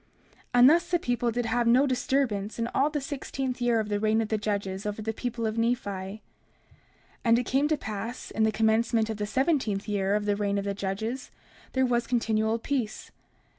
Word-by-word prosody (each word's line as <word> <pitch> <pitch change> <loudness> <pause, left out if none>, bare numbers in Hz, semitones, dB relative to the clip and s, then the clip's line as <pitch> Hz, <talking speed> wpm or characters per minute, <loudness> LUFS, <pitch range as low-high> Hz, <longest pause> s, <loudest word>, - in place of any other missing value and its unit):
30:4 - - -38 0.5
And 245 +2 +8
thus 345 +2 +2
the 350 - +3
people 245 -6 -1
did 240 +1 -1
have 235 +1 +1
no 250 +4 +5
disturbance 250 -6 0
in 230 - 0
all 280 +3 +3
the 300 -1 -2
sixteenth 265 -2 -4
year 240 -2 +3
of 215 - -2
the 205 -1 -1
reign 215 +1 +2
of 220 -1 -1
the 220 - +1
judges 200 -2 -2
over 210 +1 -4
the 220 +1 -2
people 235 0 -3
of 220 +1 -1
Nephi. 235 +2 +3
30:5 195 +1 -5 1.0
And 230 -1 +5
it 245 - +1
came 275 +3 +2
to 310 0 +1
pass 220 +1 -5
that - - -11
in - - +2
the 220 0 +4
commencement 225 0 +2
of 220 - -5
the 210 0 -2
seventeenth 255 -6 0
year 200 -1 +1
of 210 0 -1
the 205 -1 +1
reign 200 -1 0
of 200 - -2
the 200 - -1
judges, 220 +6 -3 0.4
there 260 0 +3
was 240 -2 0
continual 225 -2 +1
peace. 235 -3 -3
225 Hz, 215 wpm, -27 LUFS, 210-250 Hz, 1.0 s, And